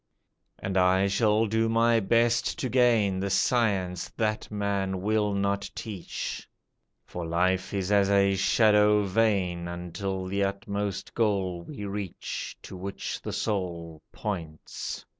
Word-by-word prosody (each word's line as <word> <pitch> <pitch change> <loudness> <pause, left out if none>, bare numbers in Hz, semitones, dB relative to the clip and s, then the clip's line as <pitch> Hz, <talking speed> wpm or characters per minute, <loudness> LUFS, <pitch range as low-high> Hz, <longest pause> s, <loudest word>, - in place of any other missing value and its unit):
"And 95 0 -3
I 95 +1 +4
shall 105 +2 +2
do 110 +1 +1
my 115 0 +4
best 115 +5 +2
to 135 -6 -2
gain 115 -6 +3
The 100 +1 -1
science 95 -4 +1
that 110 -1 -1
man 100 -2 -1
will 105 0 +1
not 100 0 -1
teach, 100 -6 -5 0.6
For 90 - -6
life 90 +3 0
is 100 -1 -2
as 100 -1 +4
a 100 -1 +4
shadow 105 +1 +4
vain, 95 -4 +1
Until 90 +2 -4
the 100 +2 0
utmost 100 0 -3
goal 95 -6 0
we 105 - -7
reach 100 -2 -5
To - - -9
which 95 +2 -5
the - - -5
soul 85 -6 -3
points. 85 -7 -5
100 Hz, 130 wpm, -27 LUFS, 95-110 Hz, 0.6 s, I